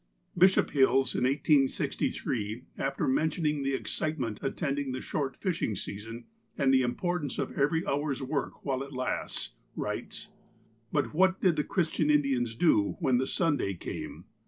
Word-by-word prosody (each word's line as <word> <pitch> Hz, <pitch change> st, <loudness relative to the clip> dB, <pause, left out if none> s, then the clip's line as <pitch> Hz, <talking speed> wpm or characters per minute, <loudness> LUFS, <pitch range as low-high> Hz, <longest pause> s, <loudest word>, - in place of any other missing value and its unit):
Bishop 185 Hz, +2 st, +5 dB
Hills, 135 Hz, -2 st, +3 dB
in -, -, +1 dB
1863, 130 Hz, -5 st, +1 dB
after 135 Hz, 0 st, -1 dB
mentioning 150 Hz, +1 st, +1 dB
the 135 Hz, 0 st, 0 dB
excitement 130 Hz, -7 st, -3 dB
attending 140 Hz, -1 st, -2 dB
the 130 Hz, -, -3 dB
short 135 Hz, -2 st, -3 dB
fishing 175 Hz, -, -1 dB
season, 115 Hz, +5 st, -6 dB, 0.3 s
and 135 Hz, -3 st, +3 dB
the 130 Hz, -, +5 dB
importance 145 Hz, +4 st, -1 dB
of -, -, -2 dB
every 150 Hz, +4 st, +1 dB
hour's 140 Hz, -1 st, -1 dB
work 140 Hz, +2 st, -3 dB
while 135 Hz, -2 st, 0 dB
it 140 Hz, +1 st, -7 dB
lasts, 130 Hz, 0 st, -2 dB, 0.2 s
writes: -, -, -4 dB, 0.6 s
"But 145 Hz, 0 st, 0 dB
what 185 Hz, +3 st, +3 dB
did 180 Hz, -4 st, +3 dB
the 150 Hz, -, +1 dB
Christian 160 Hz, -4 st, 0 dB
Indians 135 Hz, -6 st, +2 dB
do 115 Hz, -8 st, +3 dB
when 130 Hz, -7 st, +3 dB
the 130 Hz, -, 0 dB
Sunday 145 Hz, -, 0 dB
came -, -, -7 dB
140 Hz, 145 wpm, -29 LUFS, 130-155 Hz, 0.6 s, Bishop